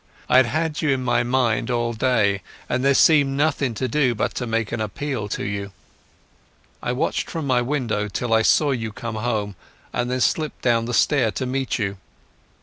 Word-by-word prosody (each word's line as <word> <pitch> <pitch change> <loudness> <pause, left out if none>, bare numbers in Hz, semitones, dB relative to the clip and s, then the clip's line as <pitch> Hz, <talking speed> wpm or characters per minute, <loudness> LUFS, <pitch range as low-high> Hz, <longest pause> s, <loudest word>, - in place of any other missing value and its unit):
I - - +5
had 130 -2 +6
had 155 +3 -1
you 155 - +1
in 135 -2 +1
my 125 - +2
mind 120 -2 +1
all 120 -1 0
day, 110 -5 +1 0.3
and 125 +1 -1
there 140 0 +4
seemed 140 -2 +4
nothing 140 -5 +1
to 130 - -1
do 130 -1 +1
but - - -1
to 125 - -4
make 115 -1 -1
an 115 - -2
appeal 110 +1 -3
to - - -3
you. 100 -1 -4 1.1
I - - -2
watched 125 - -1
from 160 -3 -4
my 130 -3 +2
window 120 -6 -1
till 115 +3 -2
I 110 - +5
saw 145 +5 +3
you 115 -4 -2
come 115 -1 -6
home, 105 -3 -2 0.4
and 120 0 -1
then 130 0 -1
slipped 155 +2 0
down 115 -2 +2
the 120 0 -2
stair 130 +1 +3
to 130 - -3
meet 130 +1 -1
you.... 100 -3 -2
120 Hz, 200 wpm, -22 LUFS, 110-135 Hz, 1.1 s, had